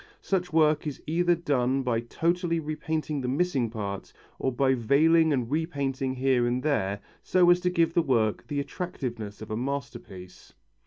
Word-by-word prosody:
Such 180 -2 -1
work 155 -1 +3
is 145 - -5
either 175 +2 +2
done 135 -5 0
by 120 -3 0
totally 170 +7 -1
repainting 155 -1 -3
the 125 - -3
missing 135 -3 0
parts, 100 -3 -5 0.3
or 130 - 0
by 130 +1 +2
veiling 155 +7 +4
and 125 -3 -1
repainting 140 -4 -1
here 130 -2 +2
and 125 +1 -1
there, 100 -9 0 0.2
so 180 -1 +4
as 175 - +4
to 180 0 0
give 165 -2 +1
the 170 - +3
work 115 -8 0
the 145 -2 -2
attractiveness 120 - -5
of 110 - -9
a - - -1
masterpiece. 120 -8 -6
140 Hz, 165 wpm, -27 LUFS, 120-165 Hz, 0.3 s, veiling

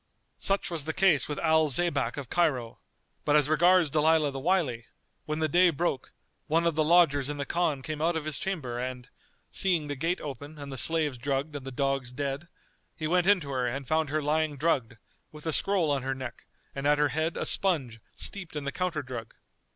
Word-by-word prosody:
Such 195 -1 +1
was 160 -4 -3
the 160 - -3
case 180 -6 +3
with 150 - -4
Al 160 -1 +3
Zaybak 140 -4 +1
of 140 -3 -5
Cairo; 130 -8 0 0.4
but 145 - +2
as 150 -2 +4
regards 175 +1 +4
Dalilah 155 -1 +3
the 135 - -5
Wily, 140 -8 0 0.4
when 155 0 -3
the 160 0 +1
day 175 +4 +5
broke, 165 -4 -2 0.4
one 165 +2 +2
of 170 - +2
the 155 +1 +1
lodgers 150 -4 +4
in 145 - -4
the 140 - -3
Khan 155 -6 -1
came 155 +1 -5
out 165 +1 +1
of 155 - -5
his 155 -2 -3
chamber 140 -11 -3
and, 125 0 -5 0.4
seeing 175 -6 +2
the 145 - -2
gate 165 +6 -1
open 145 +2 -8
and 140 -1 -8
the - - -5
slaves 150 -3 +3
drugged 140 +3 -2
and 135 -2 -7
the - - -5
dogs 135 -1 -1
dead, 140 +4 -4 0.5
he 155 - -5
went 180 +2 +2
in 205 -1 +5
to 140 -2 -6
her 130 -2 0
and 135 +2 -4
found 160 -1 +1
her 155 +1 -1
lying 150 0 0
drugged, 130 -7 0 0.3
with 150 0 -12
a 160 - 0
scroll 185 -5 +1
on 140 -2 0
her 135 +1 -2
neck 130 -2 -8 0.3
and 140 +1 -2
at 150 0 +4
her 150 0 +2
head 160 +5 -2
a - - -2
sponge 135 - +2 0.2
steeped 180 -6 -4
in 150 - -3
the 140 - -3
counter 175 -4 -2
drug. 120 -4 -8
150 Hz, 215 wpm, -28 LUFS, 135-165 Hz, 0.5 s, day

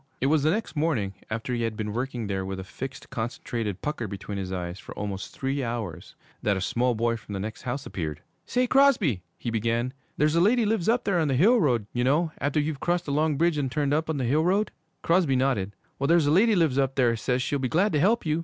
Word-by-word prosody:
It - - 0
was 150 +2 +3
the 155 - +3
next 210 +1 -1
morning, 145 -11 0 0.2
after 115 +3 -3
he 120 - -1
had 115 -2 -2
been 105 -1 -3
working 125 -1 -3
there 95 -2 -2
with 95 0 -4
a - - -5
fixed, 130 +7 -8
concentrated 115 -4 -3
pucker 150 -7 -2
between 100 0 -5
his 95 -1 -4
eyes 90 0 -4
for - - -10
almost 100 -2 -4
three 135 +1 -2
hours, 115 -8 -5 0.3
that 100 -2 +1
a - - -1
small 120 +5 +1
boy 115 +1 +1
from 110 -2 -10
the 100 - -3
next 110 +3 -5
house 130 +2 -4
appeared. 75 -4 -4 0.3
'Say, 250 0 +2
Crosby.' 240 - +4 0.2
he 120 - -4
began, 115 +3 0 0.2
'there's 150 +1 +3
a 170 - +3
lady 225 +5 +4
lives 215 -3 +1
up 240 +2 +2
there 195 -4 +1
on 160 - +2
the 135 - +1
hill 220 - +5
road 120 - +2
you 120 - 0
know, 155 +6 +2
after 145 +1 +1
you've 150 -1 -2
crossed 175 +2 0
the 145 - -3
long 150 0 +1
bridge 165 -1 +2
and 135 -3 -1
turned 145 -1 0
up 155 +1 0
on 155 - 0
the 130 - -1
hill 150 +6 +2
road?' 195 +5 +2 0.3
Crosby 165 -5 +3
nodded. 125 -7 0 0.2
'Well, 140 - +1
there's 165 -1 +4
a 145 - +3
lady 210 +6 +5
lives 155 -7 +2
up 135 -1 +1
there 120 -3 +3
says 125 +3 0
she'll 145 - -1
be 130 -2 -1
glad 195 - +2
to 150 - +3
help 220 +8 +2
you. 155 0 +1
135 Hz, 250 wpm, -26 LUFS, 115-160 Hz, 0.3 s, hill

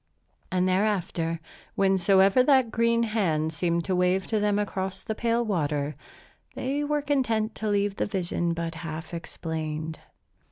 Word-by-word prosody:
And 185 0 +2
thereafter, 185 -4 0 0.4
whensoever 195 +3 +4
that 260 -3 +4
green 230 +1 +2
hand 165 -9 0
seemed 170 0 0
to 190 - 0
wave 180 +1 +2
to 215 - +3
them 205 -1 +2
across 190 -2 -2
the 220 - -2
pale 235 +1 0
water, 150 -7 -1 0.6
they 280 +3 -1
were 295 0 0
content 230 -6 +1
to 220 - -2
leave 200 -1 +1
the - - 0
vision 175 -3 -1
but 165 -1 -3
half 160 0 -7
explained. 160 -1 -4
190 Hz, 145 wpm, -27 LUFS, 165-220 Hz, 0.6 s, whensoever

